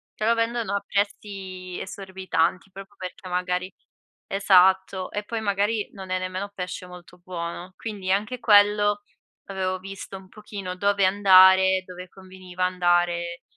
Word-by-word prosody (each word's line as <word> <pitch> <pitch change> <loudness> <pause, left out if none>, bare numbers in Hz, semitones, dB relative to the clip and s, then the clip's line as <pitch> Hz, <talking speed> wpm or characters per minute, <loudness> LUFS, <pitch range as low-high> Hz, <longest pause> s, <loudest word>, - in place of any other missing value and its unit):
te 215 - -3
lo 230 - +4
vendono 230 -1 -1
a 200 - -2
prezzi 195 -3 -4
esorbitanti, 190 -2 -2
proprio 195 +2 -11
perché 185 0 -8
magari 180 +1 -2 0.5
esatto, 190 -1 +3
e 205 - -3
poi 225 +1 -4
magari 205 +1 0
non 190 -2 -9
è 185 - 0
nemmeno 185 +2 -4
pesce 180 -1 -6
molto 180 0 -14
buono. 175 0 -6
Quindi 200 -4 -4
anche 210 +6 -1
quello, 205 -2 +4 0.4
avevo 185 -1 -2
visto 195 0 -8
un 190 0 -15
pochino 200 -3 -7
dove 200 +1 +2
andare, 190 -1 +6
dove 180 0 -10
conveniva 185 -1 -6
andare 175 -1 0
190 Hz, 135 wpm, -24 LUFS, 185-200 Hz, 0.5 s, andare